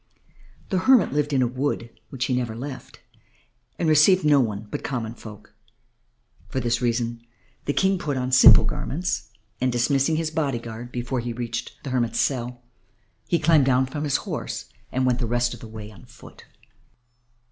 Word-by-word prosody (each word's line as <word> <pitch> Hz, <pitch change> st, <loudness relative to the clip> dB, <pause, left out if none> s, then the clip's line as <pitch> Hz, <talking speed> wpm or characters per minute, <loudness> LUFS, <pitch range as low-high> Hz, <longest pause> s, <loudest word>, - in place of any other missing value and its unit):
The 190 Hz, -, +1 dB
hermit 245 Hz, -, +4 dB
lived 145 Hz, 0 st, 0 dB
in 135 Hz, -2 st, +3 dB
a -, -, +2 dB
wood 125 Hz, -2 st, -2 dB, 0.2 s
which 130 Hz, -2 st, -3 dB
he 130 Hz, -, -1 dB
never 120 Hz, -3 st, -2 dB
left, 130 Hz, +3 st, -8 dB, 0.8 s
and 170 Hz, -, 0 dB
received 155 Hz, +4 st, +5 dB
none 115 Hz, -8 st, +2 dB
but -, -, -4 dB
common 115 Hz, -4 st, -3 dB
folk. 105 Hz, -3 st, -12 dB, 1.0 s
For 130 Hz, -, -2 dB
this 120 Hz, -1 st, 0 dB
reason 120 Hz, -1 st, -1 dB, 0.4 s
the 145 Hz, -, 0 dB
King 190 Hz, +2 st, +2 dB
put 145 Hz, -5 st, -2 dB
on 125 Hz, 0 st, -2 dB
simple 130 Hz, 0 st, +8 dB
garments, 165 Hz, -8 st, -3 dB, 0.3 s
and, 130 Hz, 0 st, +2 dB
dismissing 135 Hz, +5 st, +2 dB
his 160 Hz, 0 st, -1 dB
body 145 Hz, -6 st, -1 dB
guard 115 Hz, +1 st, -8 dB
before 125 Hz, +1 st, -3 dB
he 120 Hz, 0 st, -4 dB
reached 120 Hz, 0 st, -4 dB
the 135 Hz, -, -5 dB
hermit's 120 Hz, -3 st, 0 dB
cell, 125 Hz, -2 st, -1 dB, 0.6 s
he 170 Hz, -, +2 dB
climbed 150 Hz, -3 st, +4 dB
down 130 Hz, 0 st, +3 dB
from 145 Hz, +3 st, -5 dB
his 145 Hz, -2 st, +1 dB
horse -, -, -5 dB, 0.2 s
and 130 Hz, 0 st, 0 dB
went 125 Hz, -1 st, +1 dB
the 120 Hz, -, -1 dB
rest 120 Hz, +1 st, 0 dB
of -, -, -10 dB
the 115 Hz, -, -10 dB
way 110 Hz, -1 st, -9 dB
alone 105 Hz, -, -14 dB
and -, -, -16 dB
on -, -, -25 dB
foot. 115 Hz, -, -15 dB
125 Hz, 180 wpm, -24 LUFS, 120-145 Hz, 1.0 s, simple